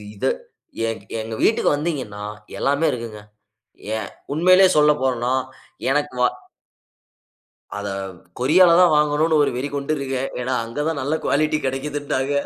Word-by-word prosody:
இதை 130 +7 0 0.6
எங் 115 - -5 0.2
எங்க 110 +1 -6
வீட்டுக்கு 225 - +3
வந்தீங்கன்னா, 140 -10 -4 0.4
எல்லாமே 145 +4 +1
இருக்குங்க. 115 -4 -6 0.8
ஏன், 110 - -4 0.2
உண்மையிலயே 185 +4 +6
சொல்லப்போறோம்ன்னா, 130 -5 +2 0.6
எனக்கு 145 0 0
வா 125 - +5 1.5
அதை 100 0 -4 0.5
கொரியாலதான் 170 +6 +5
வாங்கணும்னு 150 +1 +3
ஒரு 145 - +1
வெறி 130 +3 -2
கொண்டிருக்கேன். 140 -2 -2
ஏன்னா, 130 +1 -1
அங்க 115 +6 -4
தான் 160 -3 -2
நல்ல 145 +4 -1
குவாலிட்டி 155 +1 +1
கிடைக்குதுன்னாங்க. 140 0 -2
140 Hz, 115 wpm, -21 LUFS, 125-155 Hz, 1.5 s, உண்மையிலயே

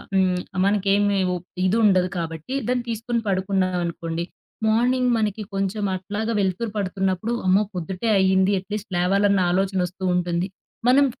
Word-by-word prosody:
హ్మ్, 185 -1 +2 0.3
మనకేమీ 200 0 +2
ఉ - - -1 0.3
ఇదుండదు 190 -2 +3
కాబట్టి 165 - -4
దాన్ని 250 -1 +1
తీసుకొని 230 +1 -2
పడుకున్నాం 190 -1 0
అనుకోండి. 170 0 -3 0.4
మార్నింగ్ 250 +3 +2
మనకి 215 -1 -1
కొంచెం 195 +2 -1
అట్లాగా 210 +4 -3
వెలుతురు 200 +3 -1
పడుతున్నప్పుడు, 195 +2 -1
అమ్మో! 190 +3 +4
పొద్దుటే 180 +5 -3
అయింది, 190 0 +3
అట్లీస్ట్ 210 +2 -6
లేవాలన్న 200 +2 +3
ఆలోచన 190 +1 +1
వస్తూ 185 +2 -11
ఉంటుంది. 175 0 0 0.4
మనం 275 +3 +6
195 Hz, 130 wpm, -23 LUFS, 185-215 Hz, 0.4 s, మనం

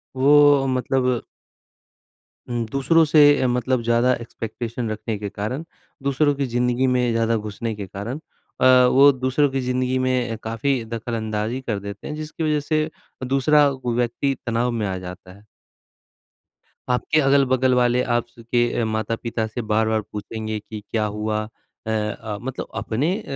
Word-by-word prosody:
वो 145 +1 +6
अ, - - -2
मतलब 130 -1 0 1.3
हुँ, 120 -1 -1
दूसरों 160 +4 +3
से 150 0 +5 0.2
अ, - - +3
मतलब 125 0 0
ज़्यादा 120 +2 +3
एक्सपेक्टेशन 115 0 -5
रखने 110 0 -3
के 105 - -4
कारण, 110 +9 -4 0.4
दूसरों 140 +1 +2
की 140 -1 -1
ज़िंदगी 125 +1 +1
में 125 -1 +2
ज़्यादा 115 0 +1
घुसने 110 +1 -4
के 100 -2 -6
कारण 105 +9 -6 0.4
अ, - - +3 0.3
वो 140 +2 +7
दूसरों 130 +3 +1
की 135 0 -1
ज़िंदगी 125 0 0
में 125 -3 0
काफ़ी 115 +2 -1
दख़लअंदाज़ी 115 +1 -3
कर 110 -5 -2
देते 100 0 -8
हैं 150 - -4
जिसकी 155 +1 -5
वजह 150 -1 +1
से 155 +1 -1 0.3
दूसरा 140 +3 +4
व 130 -3 -3
व्यक्ति 125 +3 0
तनाव 120 +1 0
में 110 -3 -2
आ 95 -1 -2
जाता 90 0 -9
है। 100 +2 -18 1.5
आपके 140 +5 +2
अगल-बगल 130 -2 +3
वाले 125 0 +3
आप 120 -1 0
स 115 - -11
के 120 - +3 0.2
ए - - +1
माता-पिता 110 +1 -2
से 115 +2 -5
बार-बार 110 0 +2
पूछेंगे 110 +1 -4
कि 105 0 -8
क्या 110 -2 0
हुआ। 105 +1 -2 0.5
अ - - -2
अ, 105 -1 -3
मतलब 130 0 -5
अपने 140 +11 -1
अ, - - -11
120 Hz, 160 wpm, -22 LUFS, 110-135 Hz, 1.5 s, वो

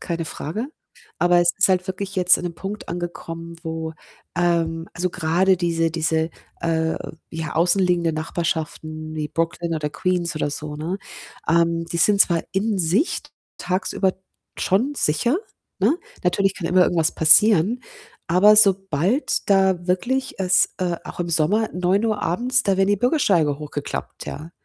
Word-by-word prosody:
keine 170 -2 -3
Frage. 170 - -5 0.5
Aber 175 0 +4
es 175 0 +3
ist 200 - +5
halt 185 -1 +1
wirklich 195 +1 -5
jetzt 180 -1 +5
an 180 - -7
'nem 170 - -4
Punkt 195 +5 -7
angekommen, 170 -1 -6
wo 160 -1 -5 0.4
ähm, 165 -1 0
also, 180 +2 -1
grade 180 +3 +2
diese 165 -2 0
diese, 160 0 0 0.3
äh, 160 -1 0 0.4
ja, 160 -2 -5
außenliegende 175 0 +2
Nachbarschaften 155 -1 -4
wie 150 -1 -3
Brooklyn 165 +2 -2
oder 150 -2 -2
Queens 175 +1 -1
oder 150 - -1
so, 150 0 -5
ne? 170 +6 -4 0.5
Ähm, 165 0 +2
die 170 - -4
sind 200 +3 +4
zwar 170 -2 +4
in 205 +1 0
sich 185 - +1
t - - -19 0.3
tagsüber 185 +1 -1 0.4
schon 240 +10 0
sicher, 235 - +1 0.4
ne? 330 - +2 0.3
Natürlich 195 +2 +1
kann 170 - -5
immer 180 +2 +4
irgendwas 165 -3 +1
passieren, 205 +6 +6 0.5
aber 205 +5 +5
sobald 195 - +3
da 190 -3 +2
wirklich 245 +10 -1
es 185 -1 +3
äh, 175 -2 -1
auch - - -8
im 175 - -2
Sommer, 170 +8 +1
21:00 200 +4 0
abends, 250 +8 +2
da 195 -4 +1
werden 195 +1 +2
die 205 - +3
Bürgersteige 190 - +1
hochgeklappt, 145 -1 -6
ja. 155 +3 -7
175 Hz, 150 wpm, -22 LUFS, 165-195 Hz, 0.5 s, passieren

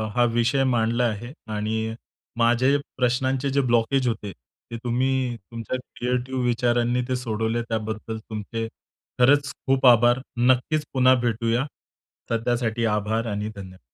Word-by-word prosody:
हा 120 - +4
विषय 120 +3 +2
मांडला 115 +2 +1
आहे, 120 +4 -3 0.2
आणि 110 +1 -2 0.4
माझे 120 +4 +3 0.2
प्रश्नांचे 130 +2 +1
जे 140 +1 +2
ब्लॉकेज 125 +3 +2
होते. 105 -3 -2
ते 65 - -12
तुम्ही 125 0 0
तुमच्या 115 +4 -5 0.2
क्रिएटिव्ह 125 +1 -1
विचारांनी 120 0 +1
ते 130 - +1
सोडवले 115 -1 -1
त्याबद्दल 110 0 -3
तुमचे 110 +1 -5 0.5
खरंच 140 +3 +4 0.2
खूप 135 0 +2
आभार! 120 +1 +6 0.2
नक्कीच 130 +5 +2
पुन्हा 130 0 +5
भेटूया. 115 +2 0 0.7
सध्यासाठी 115 0 0
आभार 110 +2 -1
आणि 105 +1 -3
धन्यवाद 95 -2 -10
120 Hz, 125 wpm, -24 LUFS, 110-125 Hz, 0.7 s, आभार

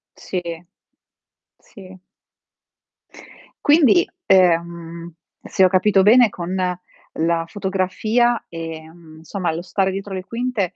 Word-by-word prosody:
Sì, 185 - -5 1.2
sì. 190 -3 -15 1.7
Quindi, 305 +2 +4 0.2
ehm, 170 -2 +1 0.3
se 190 - 0
ho - - +6
capito 190 +1 +3
bene, 235 +2 +6
con 180 -1 -6 0.6
la 165 +1 0
fotografia, 205 +6 0
ehm, 160 0 -9
insomma, 175 +1 -3
lo 165 - -4
stare 190 +2 -1
dietro 195 +1 -6
le 185 -1 -4
quinte, 230 -5 -3
185 Hz, 100 wpm, -20 LUFS, 170-205 Hz, 1.7 s, ho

